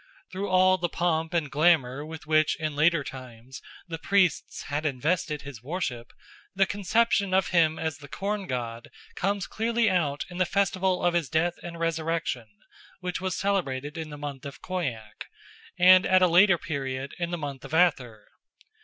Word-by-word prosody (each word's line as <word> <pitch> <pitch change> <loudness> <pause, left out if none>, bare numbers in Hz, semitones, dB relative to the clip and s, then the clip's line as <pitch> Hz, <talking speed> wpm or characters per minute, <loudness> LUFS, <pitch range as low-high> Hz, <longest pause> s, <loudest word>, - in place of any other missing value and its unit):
Through 195 +2 -4
all 185 0 +4
the 175 -1 -1
pomp 165 -1 0
and 165 -5 -1
glamour 145 -4 +2
with 160 0 -9
which 155 0 +3
in 155 -2 -3
later 155 +1 +3
times 130 -1 -10 0.3
the 165 -1 -6
priests 190 -3 +1
had 145 +2 -3
invested 150 +1 -1
his 140 -6 -9
worship, 125 -5 -4 0.4
the 195 0 +4
conception 200 -1 +1
of 190 - +2
him 160 -3 +3
as 160 -2 -3
the 145 - -11
corn 200 +5 -3
god 120 -2 -4 0.2
comes 200 +1 -1
clearly 230 0 0
out 150 -6 0
in 175 0 -9
the 185 - +3
festival 190 -2 +1
of 175 - +3
his 170 -5 0
death 170 +2 0
and 170 -1 -8
resurrection, 165 -6 -2 0.5
which 180 -1 -4
was 185 -2 -2
celebrated 150 -8 -1
in 160 -2 -5
the 145 - -8
month 145 -2 -6
of 140 0 -8
Khoiak 135 -12 -5 0.5
and 185 +1 +7
at 185 0 +5
a - - +6
later 175 +2 +5
period 135 -4 -4
in 170 -1 -1
the 175 - -3
month 140 -4 -6
of 135 - -10
Athyr. 125 -11 +1
165 Hz, 170 wpm, -27 LUFS, 140-185 Hz, 0.5 s, and